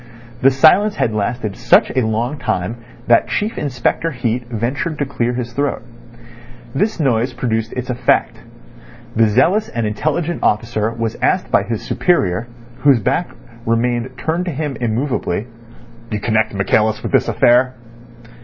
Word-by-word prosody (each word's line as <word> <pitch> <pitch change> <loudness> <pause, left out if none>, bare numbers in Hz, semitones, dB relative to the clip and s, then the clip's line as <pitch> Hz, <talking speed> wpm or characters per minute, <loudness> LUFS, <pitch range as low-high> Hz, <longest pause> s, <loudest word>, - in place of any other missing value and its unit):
The 135 - +6
silence 180 +10 +4
had 110 - 0
lasted 110 0 -2
such - - +4
a 130 - +2
long 115 +6 -1
time 90 +7 -2 0.3
that 120 -1 +4
Chief 215 +2 -1
Inspector 140 +4 -1
Heat 120 -3 -2
ventured 125 +7 -2
to 145 - -1
clear 125 -3 -1
his 120 -1 -4
throat. 140 -2 -1 0.9
This 205 +8 0
noise 125 -3 +1
produced 115 -2 -2
its 125 0 -4
effect. 120 -1 +1 0.8
The 115 0 +4
zealous 165 - +2
and 115 -2 -2
intelligent 155 +10 -1
officer 110 0 +1
was 115 -1 -3
asked - - +1
by - - +4
his 110 +2 -4
superior, 115 - +1 0.3
whose 135 -2 +4
back 170 - 0 0.3
remained 120 +2 -1
turned 170 +3 -1
to 175 - -2
him 145 -1 -3
immovably: 120 -3 -1 0.6
"You 105 - -2
connect 110 0 0
Michaelis 105 +2 +1
with - - -3
this - - +3
affair?" 125 +2 +3
120 Hz, 145 wpm, -18 LUFS, 110-140 Hz, 0.9 s, The